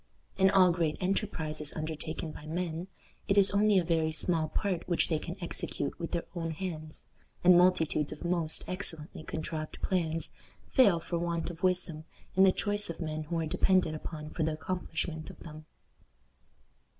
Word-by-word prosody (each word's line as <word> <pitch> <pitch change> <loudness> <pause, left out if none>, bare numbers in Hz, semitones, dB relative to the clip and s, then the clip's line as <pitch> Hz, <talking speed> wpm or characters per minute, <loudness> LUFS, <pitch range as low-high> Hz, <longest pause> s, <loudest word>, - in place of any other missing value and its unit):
In 190 0 +5
all 185 -2 +6
great 165 -3 0
enterprises 160 -6 -2
undertaken 155 0 -4
by 150 - -10
men, 170 +1 -3 0.4
it 200 -1 +2
is 200 -1 +6
only 205 0 +4
a 180 - +4
very 160 -2 +1
small 160 -1 +1
part 185 -4 -2
which 175 - +2
they 160 -3 +1
can 170 +2 -6
execute 170 -4 -3
with 170 - -3
their 170 - -1
own 165 -2 -3
hands, 160 -2 -5 0.4
and 180 0 +8
multitudes 170 -4 +3
of 155 - -7
most 170 -2 0
excellently 165 -5 -1
contrived 155 -1 -5
plans 165 -3 0 0.4
fail 205 - +5
for 170 +1 -3
want 170 0 -1
of 170 0 -12
wisdom 180 -4 0 0.3
in 190 - +4
the 190 -1 +8
choice 205 +1 -2
of 170 - -4
the 170 - -4
men 155 0 -3
who 170 +2 -2
are 165 - 0
depended 180 +1 +3
upon 155 0 -6
for 170 - -4
the 160 0 +1
accomplishment 160 -1 -3
of - - -12
them. 155 -1 -10
170 Hz, 175 wpm, -31 LUFS, 155-185 Hz, 0.4 s, and